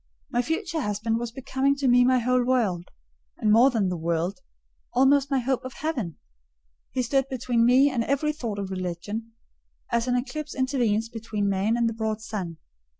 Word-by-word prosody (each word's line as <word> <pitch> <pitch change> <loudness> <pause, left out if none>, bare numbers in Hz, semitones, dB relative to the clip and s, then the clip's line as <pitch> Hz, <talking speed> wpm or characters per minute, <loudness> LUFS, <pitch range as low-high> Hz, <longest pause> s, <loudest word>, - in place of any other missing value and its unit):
My 240 - +2
future 325 - -2
husband 220 0 -1
was 240 -1 -4
becoming 265 +2 0
to 280 -1 -1
me 245 0 +6
my 255 +1 +4
whole 250 +1 +2
world; 220 -9 +1 0.5
and 215 - +2
more 235 +5 +7
than 220 -7 0
the 180 - -2
world: 170 +6 -1 0.5
almost 270 +2 +4
my 275 - +2
hope 260 0 0
of 255 0 -7
heaven. 250 - -3 0.7
He 255 - -1
stood 270 +2 +1
between 245 -2 +1
me 265 +3 +5
and 240 -3 0
every 290 +3 0
thought 230 -9 -4
of 195 -1 -4
religion, 190 +5 -4 0.6
as 235 +1 +1
an 250 - +2
eclipse 295 +4 -3
intervenes 245 -5 +1
between 220 -3 -3
man 200 +4 +1
and 235 -1 +2
the 230 - -1
broad 220 -1 -2
sun. 195 -6 -5
240 Hz, 180 wpm, -26 LUFS, 210-265 Hz, 0.7 s, more